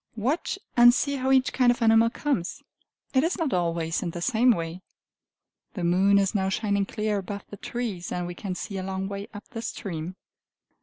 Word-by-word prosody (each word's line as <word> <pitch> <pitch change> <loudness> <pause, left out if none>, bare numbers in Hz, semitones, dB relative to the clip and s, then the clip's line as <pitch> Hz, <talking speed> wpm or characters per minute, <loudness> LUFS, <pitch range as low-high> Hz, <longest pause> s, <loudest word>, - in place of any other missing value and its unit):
Watch 265 - -1 0.2
and 240 0 +8
see 280 0 0
how 265 0 0
each 265 -1 +3
kind 250 -2 +4
of 240 - -2
animal 225 0 +5
comes; 235 -9 -2 0.5
it 260 0 +4
is 335 +3 0
not 325 -6 -1
always 170 -2 0
in 175 - -2
the 175 - -6
same 245 +2 +3
way. 170 -4 0 0.9
The 180 - -3
moon 190 +4 +4
is 195 -1 +2
now 190 -2 +1
shining 200 -1 0
clear 210 -1 -1
above 200 +1 -6
the 205 - -7
trees, 210 -6 -4
and 180 0 -2
we 175 - -5
can 185 +1 -5
see 195 +1 -5
a - - -4
long 190 0 -3
way 200 +1 -5
up 205 -1 -10
the 225 -4 -6
stream. 175 -5 -5
200 Hz, 200 wpm, -26 LUFS, 185-240 Hz, 0.9 s, and